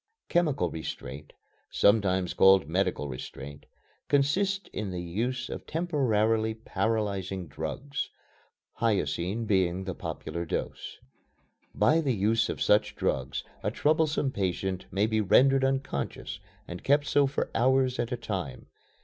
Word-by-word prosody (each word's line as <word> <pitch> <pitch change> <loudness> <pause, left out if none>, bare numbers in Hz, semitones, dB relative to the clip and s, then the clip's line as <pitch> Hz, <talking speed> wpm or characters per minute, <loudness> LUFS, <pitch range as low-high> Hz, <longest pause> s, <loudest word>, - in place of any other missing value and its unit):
Chemical 150 - +1
restraint 75 -2 -7 0.4
(sometimes 95 -4 +3
called 95 -2 +6
medical 75 - 0
restraint) 70 +2 -8 0.4
consists 190 +8 +1
in 105 -2 -3
the 90 -1 -4
use 120 +9 -2
of - - -7
temporarily 115 -9 +1
paralyzing 100 -4 -2
drugs 140 - -4 0.7
hyoscine 110 -1 0
being 95 -3 +1
the 95 -1 -4
popular 85 0 -5
"dose." 85 - -4 0.8
By 160 +2 +4
the 135 -6 0
use 110 +3 +2
of - - -2
such 105 +1 +3
drugs 65 0 -1 0.2
a - - 0
troublesome 155 -2 +1
patient 95 -2 -2
may 100 +2 +1
be 110 0 +1
rendered 135 +7 +5
unconscious 135 - -2 0.3
and 90 0 -7
kept 145 +1 +3
so 145 -1 +3
for 135 - -2
hours 130 +1 +2
at 120 - -1
a 125 - -1
time. 95 -6 -5
110 Hz, 125 wpm, -28 LUFS, 95-135 Hz, 0.8 s, called